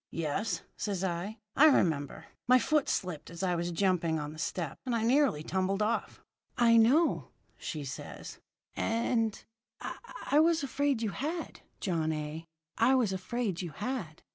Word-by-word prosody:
"'Yes,' 165 +4 -2
says 195 -3 -2
I, 190 +4 -2 0.2
'I 310 - +8
remember. 155 - +2 0.2
My 255 +1 +7
foot 275 +4 +2
slipped 180 -5 -2
as 170 +3 -6
I 180 -1 +2
was 175 0 -1
jumping 170 -3 +1
on 150 0 -5
the 155 - -11
step, 165 -2 -3
and 250 -3 -1
I 225 - 0
nearly 245 - +3
tumbled 190 +4 0
off.' 225 +2 -2 0.3
"'I 230 -1 +6
know,' 270 +9 +4 0.3
says 145 -4 -4
she. - - -7
'And - - -10 0.4
and 225 -1 0 0.4
I - - -4 0.4
_I 310 - +7
was 330 -2 +3
afraid 275 -3 0
you 215 - 0
had, 320 - -4 0.2
John 165 -4 0
A. 155 +1 -5 0.3
I 265 - +5
was 230 -7 +2
afraid 195 0 -2
you 170 -4 -6
had. 210 - -4
195 Hz, 165 wpm, -31 LUFS, 165-245 Hz, 0.4 s, I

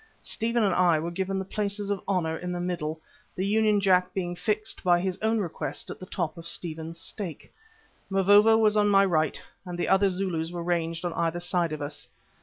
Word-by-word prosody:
Stephen 230 0 0
and 195 -3 +2
I 175 -3 +4
were 165 +3 -3
given 190 +2 -2
the 190 - -3
places 205 0 -3
of 200 - -1
honour 175 -5 0
in 180 +2 -5
the 175 - -3
middle, 165 -3 -3 0.4
the 190 - -1
Union 210 0 +3
Jack 185 -2 +3
being 175 -2 -2
fixed, 215 +4 -2
by 175 -2 +4
his 185 +1 -2
own 220 +1 +2
request, 180 -6 -3
to - - -3
the 185 - -11
top 170 -3 -3
of 165 - -8
Stephen's 165 -1 -3
stake. 180 -5 -6 0.6
Mavovo 205 +3 +5
was 215 -1 +3
on 205 -1 +4
my 195 -1 +5
right, 160 -5 +1 0.2
and 180 -2 -6
the 175 - -1
other 195 +1 +4
Zulus 180 -4 -2
were 175 -1 -5
ranged 170 0 -1
on 175 - -1
either 170 0 -1
side 175 -1 0
of 155 -1 -4
us. 145 +1 -5
180 Hz, 210 wpm, -27 LUFS, 170-200 Hz, 0.6 s, Mavovo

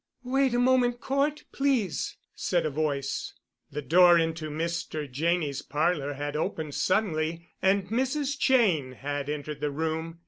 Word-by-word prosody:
"Wait 265 +1 +2
a - - +3
moment, 245 -1 +3
Cort, 280 +3 0
please," 260 - 0 0.2
said - - 0
a 155 - -1
voice. 140 -2 -2 0.4
The 150 - -4
door 175 +3 +6
into 165 -1 -1
Mr. 160 -1 -3
Janney's 150 +1 0
parlor 150 -1 0
had 145 +1 -4
opened 155 -1 -2
suddenly, 170 -4 0
and 190 0 +2
Mrs. 265 +4 0
Cheyne 185 - +3
had 145 +2 -4
entered 150 0 -4
the 150 - 0
room. 160 +2 -3
165 Hz, 140 wpm, -28 LUFS, 150-230 Hz, 0.4 s, door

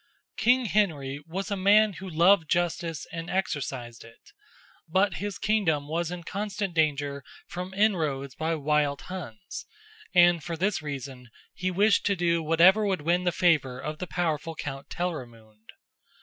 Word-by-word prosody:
King 245 +5 +3
Henry 150 -9 0
was 190 +5 -4
a - - +1
man 205 +2 +4
who 190 +1 -8
loved 170 0 +4
justice 170 -2 -1
and 165 0 -6
exercised 135 -10 -3
it, 115 - -18 0.6
but 190 +1 +2
his 205 +1 -4
kingdom 165 -9 +1
was 165 +2 -1
in 175 -1 -6
constant 200 +1 -3
danger 145 -3 0 0.2
from 180 +1 -6
inroads 155 -10 +1
by 160 +1 -1
wild 150 -1 0
Huns, 145 - -8 0.4
and 175 -3 +5
for 170 +1 -4
this 190 +1 0
reason 135 -4 -7 0.2
he 185 0 -2
wished 200 +3 +3
to 200 - +2
do 170 -2 +1
whatever 170 +7 +5
would 190 -5 0
win 175 +4 +1
the 175 - +3
favor 150 -8 +2
of 150 +3 -5
the 180 - -4
powerful 165 -2 -2
Count 135 -2 -6
Telramund. 115 -10 -6
170 Hz, 150 wpm, -27 LUFS, 145-190 Hz, 0.6 s, and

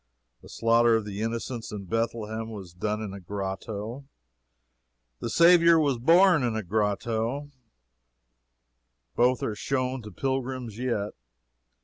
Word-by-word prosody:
The - - -15
slaughter 115 0 +3
of 110 -2 -1
the 105 0 -5
innocents 115 +1 -4
in 100 -2 -6
Bethlehem 115 +1 -2
was 95 -6 -9
done 105 +4 -2
in 100 -3 -6
a 100 - -7
grotto; 100 +6 -5 1.1
the - - -4
Saviour 170 +2 +6
was 140 -5 +1
born 170 +4 +5
in 120 -3 0
a 110 - -2
grotto 110 +7 -1 1.6
both 125 +1 +2
are 110 - -1
shown 130 +3 -2
to 105 -1 -10
pilgrims 130 -1 -3
yet. 115 -5 -1
115 Hz, 125 wpm, -27 LUFS, 105-130 Hz, 1.6 s, Saviour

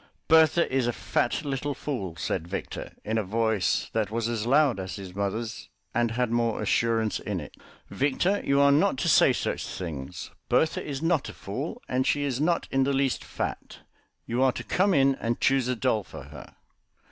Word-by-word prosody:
"Bertha 160 +1 +5
is 130 -3 +2
a 120 - 0
fat 125 +7 -1
little 140 0 -2
fool," 100 - -4
said 85 - -3
Victor, 95 - -5
in 110 +1 0
a - - -1
voice 110 -2 0
that 110 -3 0
was 115 +1 -1
as 115 -1 -2
loud 140 -4 +4
as 95 0 -5
his 95 -3 -8
mother's 110 +4 -3 0.2
and 120 0 +2
had 120 +1 -1
more 115 -2 +1
assurance 110 +1 +1
in 100 -3 -3
it. 75 - -10 0.3
"Victor, 175 +9 +1
you 140 0 +2
are 140 0 +6
not 150 +2 +3
to - - -1
say - - +6
such - - -2
things. 75 -7 -6 0.2
Bertha 160 - +2
is 140 0 -5
not 165 -4 +1
a - - -8
fool, 145 - -5
and 130 +1 0
she 145 +2 +1
is 135 -1 -1
not 170 +2 +1
in 135 0 +3
the 140 +1 +1
least 135 -1 0
fat. - - -5 0.4
You 120 +2 -1
are 130 -1 +4
to - - -6
come 190 0 +2
in 135 0 +4
and 115 0 -1
choose 135 -2 +2
a 125 - 0
doll 110 -1 +1
for - - -10
her." - - -12
125 Hz, 195 wpm, -27 LUFS, 110-140 Hz, 0.4 s, are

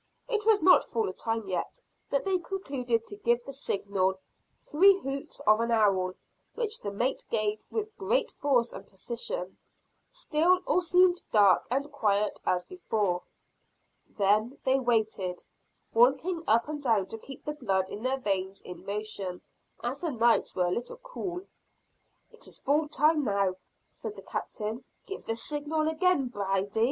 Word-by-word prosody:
It 440 -3 -1
was 430 -6 +5
not 365 +1 +7
full 225 -5 -2
time 225 -1 -3
yet, 185 - -3 0.3
but 280 - 0
they 380 -2 +2
concluded 270 - -2
to 205 - -7
give 235 +2 +1
the 275 - -7
signal, 195 -7 0 0.4
three 385 +6 +5
hoots 275 -3 -5
of 215 +1 +4
an 230 0 0
owl; 195 -5 +3 0.4
which 450 -2 -2
the 200 - -3
mate 240 +7 -1
gave 215 -1 0
with 435 -1 -3
great 460 +4 +1
force 250 -5 +1
and - - -9
precision. 190 -2 -5 0.5
Still 365 -6 +2
all 365 - +3
seemed 360 +1 +4
dark 200 -4 +5
and 275 +4 -1
quiet 210 -6 +1
as 180 -1 +1
before. 210 - -1 1.0
Then 215 +6 +2
they 265 +1 +3
waited, 220 -7 0 0.5
walking 270 +9 +3
up 230 +4 +4
and 300 -1 -4
down 225 -8 +2
to 225 - -8
keep 270 +3 -11
the 300 - -2
blood 195 -10 0
in 205 - -6
their 260 +2 0
veins 195 -5 -2
in 180 - -9
motion, 200 -3 -4 0.4
as 250 +4 -2
the 340 - -2
nights 235 -2 +2
were 180 - +2
a 175 - 0
little 240 - -3
cool. 385 -8 -6 0.9
"It - - -6
is - - -7
full 300 +2 +2
time 300 +1 +3
now," 200 -5 +1 0.3
said 425 - -6
the - - -11
Captain, 220 +3 -4 0.2
"give 395 - -8
the 225 - 0
signal 300 +5 -1
again, 320 -4 +2
Brady." 200 -1 -1
240 Hz, 160 wpm, -29 LUFS, 205-315 Hz, 1.0 s, not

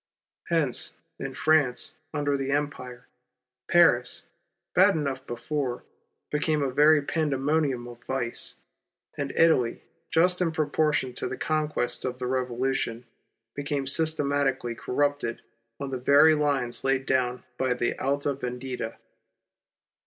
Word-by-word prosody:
Hence, 160 -7 0 0.2
in - - -5
Finance 150 -3 +2 0.2
under 145 -2 0
the 135 -1 -2
Empire, 135 -4 -3 0.6
Paris, 165 -8 +4 0.5
bad - - +5
enough 140 -3 -3
before, 125 +1 -3 0.5
became 150 0 +1
a 135 - 0
very 150 +2 +5
pandemonium 140 -4 0
of 120 0 -12
vice; 125 -3 -2 0.6
and 140 -1 -3
Italy 160 -8 +3 0.3
just 180 +2 +3
in 170 -2 +2
proportion 150 -3 +1
to - - -4
the 130 - -5
con 155 -1 0
quests 120 -5 -2
of 125 -1 -3
the 125 - -4
Revolution, 125 -1 -1 0.5
became 140 -1 -2
systematic^ally 140 -4 0
corrupted 145 -2 -1 0.4
on 140 -1 -4
the 130 - -3
very 140 +5 +6
lines 140 -5 0
laid 135 0 +1
down 125 -2 0 0.2
by 130 -1 +1
the 120 -1 -1
Alta 140 +1 0
Yendita. 125 -2 -5
135 Hz, 125 wpm, -27 LUFS, 125-150 Hz, 0.6 s, very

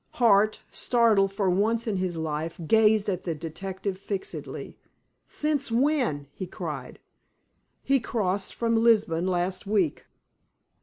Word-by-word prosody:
Hart, 215 -3 +3
startled 220 -5 +3
for 195 0 -1
once 215 +5 +1
in 215 -4 -1
his 185 -2 -2
life, 160 +1 -3
gazed 215 +2 +4
at 185 -3 -1
the 165 -3 -2
detective 185 +5 -5
fixedly. 200 -1 -5 0.5
"Since 295 -4 -1
when?" 245 - +1
he 185 - -6
cried. - - -6 0.9
"He 275 0 +3
crossed 200 -4 -2
from 230 -1 +1
Lisbon 205 -7 +3
last 185 +1 -1
week." 195 -7 0
200 Hz, 120 wpm, -26 LUFS, 180-230 Hz, 0.9 s, gazed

